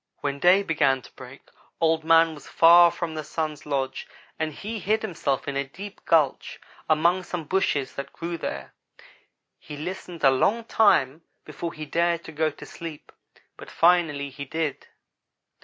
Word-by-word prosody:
When 140 0 -3
day 180 +5 +5
began 140 -7 +1
to - - -15
break 130 +1 -13 0.4
Old 160 -1 +2
man 165 0 +5
was 145 -3 -13
far 170 +1 +7
from 170 -1 -5
the 155 -1 -5
Sun's 155 -1 -4
lodge 135 -2 -2 0.3
and 160 0 -1
he 215 +8 -6
hid 215 +4 0
himself 155 -10 -2
in 140 - -3
a 140 - 0
deep 195 +9 -11
gulch 155 -5 +1 0.3
among 170 +4 +3
some 175 -2 -5
bushes 145 -5 0
that 140 - -7
grew 170 +1 -5
there. 70 - -6 0.9
He 150 - -10
listened 175 +1 -7
a 135 - +7
long 210 - +1
time 165 - +3 0.2
before 170 -1 -6
he 155 0 -7
dared 170 +2 0
to - - -9
go 155 0 0
to 150 - -12
sleep, 165 -3 -9 0.5
but - - -11
finally 165 -5 +2
he 140 +1 -7
did. 155 0 -3
160 Hz, 165 wpm, -25 LUFS, 140-175 Hz, 0.9 s, far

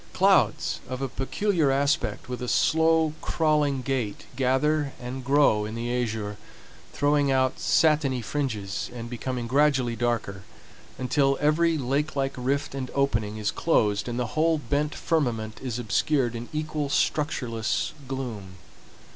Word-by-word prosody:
Clouds - - +3
of 130 0 -4
a 135 - -1
peculiar 160 +5 0
aspect 140 +1 0
with 125 -1 -5
a 125 - -3
slow, 160 +2 +3
crawling 150 -4 +1
gait 125 -5 -2
gather 140 +3 +1
and 125 +1 -6
grow 135 -5 +3
in 110 +1 -5
the 120 +1 -2
azure, 110 -4 -2 0.5
throwing 145 0 +2
out 130 -1 +1
satiny 150 -5 +3
fringes, 110 -6 -3
and 120 0 -7
becoming 125 0 -3
gradually 130 -2 +2
darker 115 -5 -2 0.6
until 135 +2 +1
every 160 +2 +3
lake 140 +3 -1
like 135 -1 0
rift 135 +3 -1
and 130 -2 -4
opening 110 -7 0
is 105 -1 -1
closed 105 -11 +1
and 120 0 -3
the 120 -3 -3
whole 160 +1 +3
bent 145 +1 -1
firmament 115 -9 -1
is 125 -3 -3
obscured 120 +3 +1
in 115 +1 -6
equal 155 -2 -2
structureless 125 -7 0
gloom. 115 -8 -5
130 Hz, 140 wpm, -26 LUFS, 120-150 Hz, 0.6 s, Clouds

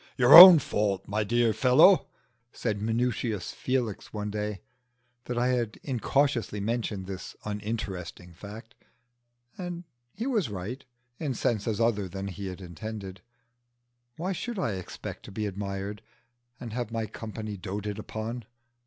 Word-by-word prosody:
"Your 125 +1 +6
own 180 +1 +14
fault, 105 -8 -1
my 105 +1 0
dear 120 +1 +2
fellow!" 130 - +5 0.4
said 105 -4 -3
Minutius 115 -3 -1
Felix, 125 -5 -2
one 105 -1 -4
day 105 -2 -4 0.6
that 120 - -4
I 125 +1 +2
had 120 -4 -1
incautiously 130 -3 0
mentioned 105 -2 -2
this 95 -1 -7
uninteresting 105 -5 -5
fact. 105 +6 -11 0.9
And 175 -1 -5 0.3
he 230 - -4
was 225 - 0
right 105 +7 -6 0.4
in 145 -6 -2
senses 110 -1 -1
other 105 -5 +1
than 95 +1 -5
he 95 +1 -6
intended. 95 +2 -8 1.0
Why 180 +4 -2
should 235 +5 -4
I 180 - 0
expect 95 -2 -7
to - - -10
be 105 +2 -3
admired, 100 +1 -4 0.6
and 115 -3 -7
have 120 -2 -3
my 115 -1 -2
company 110 0 -7
doated 105 +2 -5
on? 115 +1 -4
110 Hz, 135 wpm, -28 LUFS, 100-120 Hz, 1.0 s, own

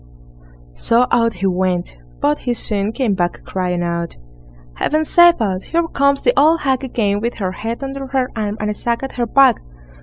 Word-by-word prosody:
So 230 - +2
out 230 -1 +2
he 185 +2 -3
went, 180 - -1 0.3
but 150 - +1
he 245 - -1
soon 210 -2 0
came 230 -3 0
back 175 -2 -2
crying 180 -2 -2
out: 170 0 -3 0.6
"Heaven 310 - 0
save 345 0 +5
us! 195 -4 -2
Here 335 0 0
comes 280 -1 +1
the - - +3
old 320 +2 +4
hag 265 -1 0
again 210 -6 -1
with 235 +2 -2
her 190 -3 -3
head 225 +7 -5
under 270 0 -5
her 260 -1 -1
arm, 210 -1 -3
and 210 0 -1
a - - -2
sack 235 +4 -3
at 270 - -6
her 240 -1 0
back." 265 0 +4
230 Hz, 190 wpm, -18 LUFS, 190-270 Hz, 0.6 s, save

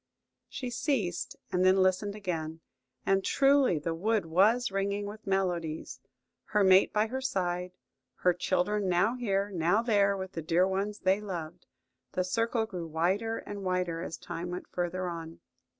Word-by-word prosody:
She 255 -3 -5
ceased, 225 - -1 0.2
and 180 0 +2
then 185 +1 +5
listened 190 +2 +2
again, 165 -5 -4 0.4
and 195 0 +2
truly 275 - +4
the 165 +3 -2
wood 210 +4 0
was 205 +8 +3
ringing 200 +1 -1
with 210 +1 -9
melodies: 175 -5 -1 0.5
her 210 -1 +2
mate 190 0 +6
by 210 0 +2
her 260 +4 -4
side; 180 -8 -2 0.5
her 180 - +4
children 190 +3 0
now 180 +6 +3
here, 205 -4 -1
now 180 +5 +2
there 200 -4 +3
with 190 -1 -5
the 165 - -5
dear 170 +3 +2
ones 200 +2 -2
they 190 +2 +2
loved. 175 -4 -6 0.5
The 185 - +1
circle 230 +4 0
grew 180 -6 -6
wider 190 +8 0
and 205 -1 -7
wider 180 -3 -1
as 165 -3 -5
time 175 +1 -6
went 180 +1 -5
further 180 +1 -2
on. 165 -1 -6
190 Hz, 160 wpm, -30 LUFS, 175-210 Hz, 0.5 s, mate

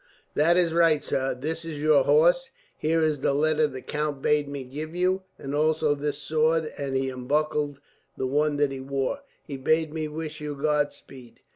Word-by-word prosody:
"That 170 +4 +3
is 170 -2 +2
right, 165 -3 +4
sir. 135 -1 -1
This 160 +4 -3
is 160 -3 -6
your 150 -3 +4
horse. 170 - +4 0.3
Here 160 +1 +1
is 155 -2 +1
the 140 - +1
letter 155 +1 +2
the 130 -2 -8
count 150 -2 -2
bade 150 +1 +2
me 140 -1 -5
give 150 +6 -7
you, 185 +1 +1 0.2
and 135 0 -6
also 155 0 +2
this 145 0 -3
sword," 155 +2 +1
and 140 -2 -3
he 135 0 0
unbuckled 145 +2 -1 0.4
the 130 - -1
one 145 +2 +1
that 145 -1 +2
he 135 - -5
wore. 135 - -2 0.3
"He 140 -3 -6
bade 155 +3 +1
me 155 -1 -2
wish 155 0 -6
you 150 -1 -4
God 145 0 +1
speed." 125 -3 -14
150 Hz, 190 wpm, -26 LUFS, 140-155 Hz, 0.4 s, right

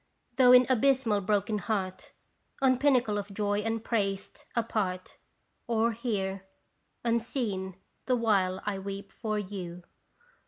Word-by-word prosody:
though 250 -2 +7
in 250 0 +8
abysmal 255 -4 +3
broken 205 +2 0
heart: 190 -2 -3 0.5
On 260 -2 +3
pinnacle 245 -7 +3
of 200 0 -7
joy 205 0 0
upraised, 215 -3 -2
apart: 200 -6 -2 0.5
Or 230 0 +2
here, 195 -5 -3 0.6
unseen, 230 -5 -1 0.3
the 255 - +3
while 195 -5 +1
I 200 -2 -2
weep 195 0 -6
for 215 0 -3
you. 185 -4 -6
210 Hz, 115 wpm, -29 LUFS, 195-235 Hz, 0.6 s, in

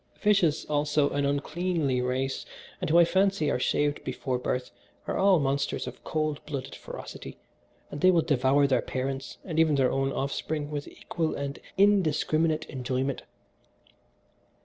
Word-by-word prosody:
Fishes, 190 -7 +2
also, 150 0 +1
an 140 0 0
uncleanly 145 -1 0
race, 130 +2 -1 0.4
and - - -1
who 165 - +5
I 170 - +8
fancy 190 -4 +2
are - - 0
shaved 145 +3 0
before 130 0 -2
birth, 125 0 -2 0.3
are - - -2
all 195 -1 +5
monsters 140 0 -1
of - - -9
cold 155 -2 -2
blooded 135 -3 -5
ferocity, - - -9 0.5
and 145 - -6
they 185 - +6
will 170 -3 +4
devour 140 0 +3
their 130 -3 +2
parents 135 +1 -4
and 160 -4 -2
even 160 -2 +4
their 130 -2 +3
own 135 0 0
offspring 145 +2 -3
with 145 -1 -4
equal 165 -2 -3
and 140 0 -4 0.2
indiscriminate 160 -5 +3
enjoyment. 130 0 -2
145 Hz, 150 wpm, -28 LUFS, 135-160 Hz, 0.5 s, I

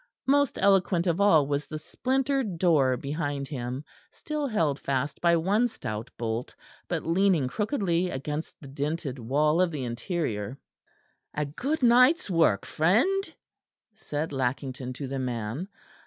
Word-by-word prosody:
Most 285 0 +3
eloquent 190 -3 +3
of 175 +2 +1
all 165 -8 +5
was 145 +1 -2
the 155 - -5
splintered 260 - -1
door 145 -8 +3
behind 145 0 -3
him, 130 -1 -4 0.3
still 300 -2 -4
held 160 - 0
fast 140 +1 -2
by 170 -1 +4
one 200 +8 +2
stout 110 - -6
bolt, 115 +1 -3 0.3
but - - -2
leaning 170 -4 +3
crookedly 185 - 0
against 150 +3 -5
the 140 - -11
dinted 140 0 -3
wall 150 +8 +2
of 185 - +3
the 150 -5 -4
interior. 120 - -3 0.8
"A 150 - 0
good 260 - -3
night's 250 - +5
work, 165 - +3
friend," 265 - +2 0.6
said 155 -8 -4
Lackington 130 0 -2
to 135 +1 -6
the 135 +1 -3
man. 125 - -3
155 Hz, 140 wpm, -27 LUFS, 135-200 Hz, 0.8 s, all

